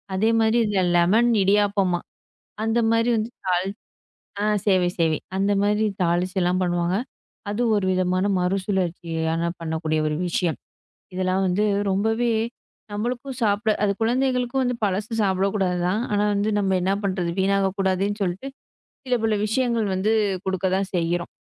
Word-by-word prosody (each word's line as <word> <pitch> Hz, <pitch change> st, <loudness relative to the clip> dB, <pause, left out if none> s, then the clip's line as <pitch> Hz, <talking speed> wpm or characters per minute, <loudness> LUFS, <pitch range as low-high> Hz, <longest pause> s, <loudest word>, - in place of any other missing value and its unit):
அதே 215 Hz, +4 st, +2 dB
மாரி 225 Hz, +1 st, +3 dB
இதுல 200 Hz, -3 st, +1 dB
லெமன் 215 Hz, +8 st, +4 dB
இடியாப்பமா, 195 Hz, -3 st, +2 dB, 0.7 s
அந்த 225 Hz, +1 st, +1 dB
மாரி 230 Hz, +1 st, +2 dB
வந்து 220 Hz, +1 st, -2 dB
தாளிச்சு 185 Hz, -, +1 dB, 0.9 s
ஆ -, -, +1 dB, 0.2 s
சேவை 185 Hz, -3 st, +3 dB
சேவை. 160 Hz, -2 st, +2 dB, 0.2 s
அந்த 200 Hz, +1 st, +1 dB
மாரி 210 Hz, +1 st, +2 dB, 0.2 s
தாளிச்சு 175 Hz, +2 st, 0 dB
எல்லாம் 180 Hz, +1 st, +1 dB
பண்ணுவாங்க. 175 Hz, +1 st, 0 dB, 0.5 s
அது 210 Hz, +4 st, -2 dB
ஒரு 200 Hz, -2 st, 0 dB
விதமான 185 Hz, +1 st, +1 dB
மறுசுழற்சியா 180 Hz, -4 st, -1 dB, 0.3 s
பண்ணக்கூடிய 160 Hz, -1 st, -1 dB
ஒரு 150 Hz, -, -1 dB
விஷயம். 170 Hz, -1 st, -1 dB, 0.6 s
இதெல்லாம் 185 Hz, +1 st, 0 dB
வந்து 185 Hz, +4 st, +1 dB, 0.3 s
ரொம்பவே 225 Hz, +4 st, +1 dB, 0.6 s
நம்மளுக்கும் 245 Hz, +5 st, -4 dB
சாப்பிட 215 Hz, +1 st, +2 dB
அது 200 Hz, -, +3 dB
குழந்தைகளுக்கும் 250 Hz, +2 st, +1 dB
வந்து 250 Hz, -1 st, 0 dB
பழசு 205 Hz, +4 st, -2 dB
சாப்பிடக் 195 Hz, 0 st, +1 dB
கூடாதுதான். 180 Hz, +1 st, 0 dB
ஆனா 205 Hz, 0 st, +2 dB
வந்து, 205 Hz, +2 st, 0 dB
நம்ம 190 Hz, -1 st, +1 dB
என்னா 190 Hz, +2 st, +1 dB
பண்றது? 185 Hz, -3 st, -1 dB
வீணாகக் 195 Hz, 0 st, +1 dB
கூடாதுன்னு 195 Hz, +2 st, 0 dB
சொல்லிட்டு 190 Hz, +10 st, -3 dB, 0.6 s
சில 250 Hz, -1 st, +1 dB
சில 220 Hz, -1 st, +2 dB
விஷயங்கள் 230 Hz, -1 st, 0 dB
வந்து 205 Hz, +4 st, +1 dB, 0.3 s
குடுக்கத்தான் 190 Hz, +1 st, -1 dB
செய்யுறோம். 170 Hz, 0 st, -1 dB
195 Hz, 135 wpm, -23 LUFS, 180-215 Hz, 0.9 s, லெமன்